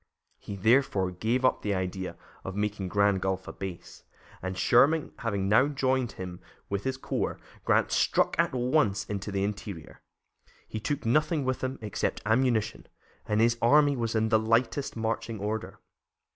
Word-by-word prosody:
He, 100 - -7
therefore, 100 -3 +2
gave 115 +8 0
up 130 - +2
the 105 -1 -1
idea 95 0 -3 0.3
of 95 - -6
making 105 -2 -2
Grand 100 0 +2
Gulf 95 -1 -2
a - - -6
base, 95 -3 -8 0.4
and 95 0 -4
Sherman 145 - +4
having 100 -4 -1
now 115 +7 +5
joined 130 -4 0
him 90 -1 -7 0.3
with 100 0 -3
his 130 0 -1
corps, - - -2 0.3
Grant - - +3
struck - - +2
at - - +3
once 125 -4 +1
into 100 0 -4
the 100 0 -1
interior. 100 -4 -6 0.7
He 110 - -5
took 145 +5 -3
nothing 150 +4 +2
with 130 0 -1
him 130 +1 -2
except 105 -3 -2
ammunition, 110 -1 +1 0.4
and 105 0 +1
his 115 +1 +3
army 145 +4 +5
was 115 -2 -2
in 110 0 +2
the 110 -1 +4
lightest 115 +4 0
marching 115 0 -2
order. 105 -1 -4
110 Hz, 160 wpm, -28 LUFS, 100-130 Hz, 0.7 s, now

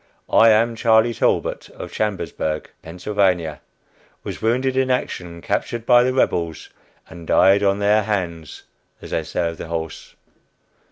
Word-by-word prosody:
"I 115 - +7
am 115 +2 +3
Charlie 115 +1 +3
Talbot, - - -1
of - - -8
Chambersburg, 95 -7 -3
Pa. 90 -2 -1 0.7
Was - - -7
wounded 130 +4 0
in 130 0 +1
action, 90 -9 -3
captured 120 -1 -2
by 120 0 +6
the 125 +1 +1
Rebels, 85 - -1 0.4
and 85 -1 -12
'died 95 +2 +5
on 100 -1 +2
their 105 +1 +3
hands' 90 -6 -4 0.4
as - - -11
they - - 0
say 85 - -2
of 85 - -8
the - - -6
horse." 80 -1 -6
100 Hz, 145 wpm, -21 LUFS, 85-115 Hz, 0.7 s, I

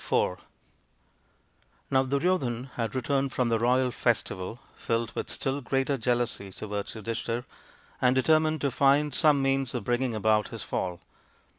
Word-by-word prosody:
IV - - +1 1.5
Now 130 -1 +4
Duryodhan 135 -3 0
had 115 -1 -3
returned 135 +1 0
from 125 -2 +1
the 115 -1 +2
royal 125 +2 +2
festival 110 -2 -1
filled 115 -2 -2
with - - -4
still 135 +1 -2
greater 135 +2 0
jealousy 120 -5 -1
towards 105 +1 -5
Yudhishthir, 115 +2 -3 0.6
and 125 0 +4
determined 155 +3 +3
to 140 - +1
find 140 +2 +3
some 145 -1 +4
means 135 -2 0
of 120 - -2
bringing 120 +1 0
about 110 0 +2
his - - -6
fall. 90 -2 -3
125 Hz, 140 wpm, -28 LUFS, 115-135 Hz, 1.5 s, Now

